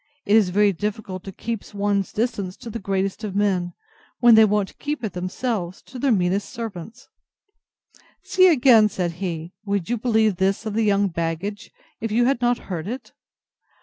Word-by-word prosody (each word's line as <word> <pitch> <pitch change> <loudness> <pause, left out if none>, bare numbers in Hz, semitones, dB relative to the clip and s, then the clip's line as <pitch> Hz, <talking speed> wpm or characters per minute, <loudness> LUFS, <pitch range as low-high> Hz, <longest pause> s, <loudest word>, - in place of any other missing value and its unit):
It 205 - +3
is 215 -5 +5
very 200 +2 +3
difficult 200 -1 -4
to 195 - -6
keep 215 +1 -6
one's 200 -1 0
distance 210 -5 -2
to 240 -3 -9
the 230 - -5
greatest 195 +2 -2
of 200 -3 -4
men, 185 -4 0 0.5
when 240 -1 +7
they 220 0 +8
won't 210 -2 -1
keep 295 -3 -3
it 210 -5 -3
themselves 185 0 -3
to 255 - -10
their 275 +1 +2
meanest 190 -1 +1
servants. 225 0 -8 1.2
See 370 0 +4
again! 245 -9 +6
said 180 -4 -2
he; 170 -1 -4
could 200 -3 -2
you 240 - 0
believe 220 -4 +2
this 195 +4 0
of 215 - -3
the 225 - +1
young 200 -1 +2
baggage, 170 +5 -4 0.3
if 225 -1 -3
you 240 +3 +3
had 260 -1 +1
not 240 0 +2
heard 175 -3 -5
it? 250 +3 -6
205 Hz, 180 wpm, -23 LUFS, 190-230 Hz, 1.2 s, they